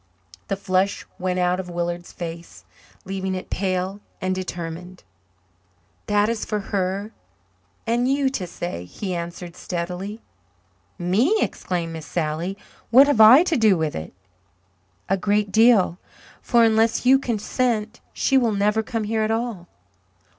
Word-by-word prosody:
The - - -1
flush 190 0 0
went 185 0 -1
out 180 0 +1
of 180 -1 -5
Willard's 175 0 -3
face, 170 - -8 0.4
leaving 190 0 -3
it 185 - -7
pale 190 +1 -1 0.2
and 185 0 -1
determined. 180 -1 -6 1.0
"That 205 0 +3
is 230 -1 -2
for 210 - -2
her 195 +2 -1 0.7
and 240 +3 +1
you 280 0 +2
to 190 -9 -3
say," 170 - -5
he 185 - -5
answered 170 0 -6
steadily. 180 +5 -5 0.7
"Me!" 205 - +2
exclaimed 170 - -2
Miss 160 -2 -8
Sally. 170 +3 -2 0.3
"What 260 +4 +8
have 285 -6 +3
I 245 +9 +9
to 355 -3 0
do 215 -6 +4
with 160 -2 -2
it?" 80 - -6 1.0
"A 195 - +1
great 205 +1 0
deal 215 -4 +4 0.4
for 235 -2 +3
unless 225 +1 +3
you 265 +1 +6
consent 235 -1 -1
she 270 -1 +2
will 235 -4 +1
never 210 +2 +2
come 225 -1 -3
here 220 +1 -1
at 215 - 0
all." 225 -6 -2
195 Hz, 140 wpm, -23 LUFS, 180-225 Hz, 1.0 s, I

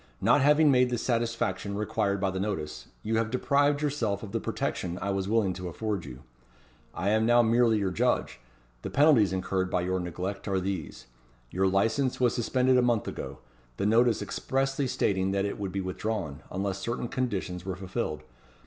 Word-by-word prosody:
Not 145 - +4
having 150 +1 +5
made 125 -1 +4
the 120 - -1
satisfaction 115 -5 -1
required 105 -1 0
by 95 0 0
the 95 - -3
notice, 95 -7 -4 0.2
you 110 +1 0
have 115 0 0
deprived 145 +4 +2
yourself 115 -9 -1
of 105 - -7
the - - -1
protection 90 -1 -3
I 100 - -2
was 95 0 -2
willing 105 -4 +2
to 90 0 -6
afford 100 +1 -3
you. 65 0 -10 0.7
I 95 +4 -1
am 110 +1 +2
now 120 0 +5
merely 115 0 +3
your 100 -3 0
judge. 90 - 0 0.4
The - - -5
penalties 140 - +5
incurred 95 0 -1
by 90 - 0
your 95 +1 -1
neglect 90 +4 -4
are 95 -2 +1
these: 95 -4 -4 0.5
Your 95 +1 +1
licence 115 +7 +1
was 125 -2 +3
suspended 130 +2 +2
a - - +4
month 120 -4 +1
ago; - - -6 0.4
the - - -1
notice 115 +2 +3
expressly 135 +1 -1
stating 95 -5 0
that 100 0 +1
it 100 - -4
would 100 -2 -3
be 95 +1 -2
withdrawn, 95 -5 -3
unless 95 +1 -2
certain 115 +4 -3
conditions 100 -8 -3
were 95 -1 -4
fulfilled. 95 -3 -4
100 Hz, 185 wpm, -28 LUFS, 95-120 Hz, 0.7 s, having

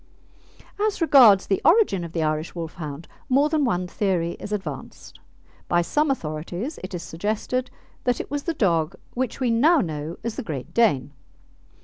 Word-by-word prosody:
As 425 0 0
regards 250 - +7
the 195 - 0
origin 335 - +4
of 170 - -7
the 165 -1 -1
Irish 155 +2 -2
Wolfhound, 160 -2 -6 0.2
more 280 +3 +4
than 305 -1 +1
one 180 -8 0
theory 180 -2 -1
is - - -7
advanced. 205 -2 -6 0.5
By 175 0 +2
some 300 - +1
authorities 175 - -3
it 185 0 -5
is 170 - -5
suggested 215 +9 -2 0.4
that 245 -1 +1
it - - -6
was 290 0 -1
the 335 - -1
dog 170 - +1 0.2
which 255 0 -2
we 250 -3 +1
now 300 +10 +5
know 155 - -3
as 230 -1 -4
the - - -3
Great 145 - -6
Dane. 145 - +2
195 Hz, 165 wpm, -24 LUFS, 165-260 Hz, 0.5 s, regards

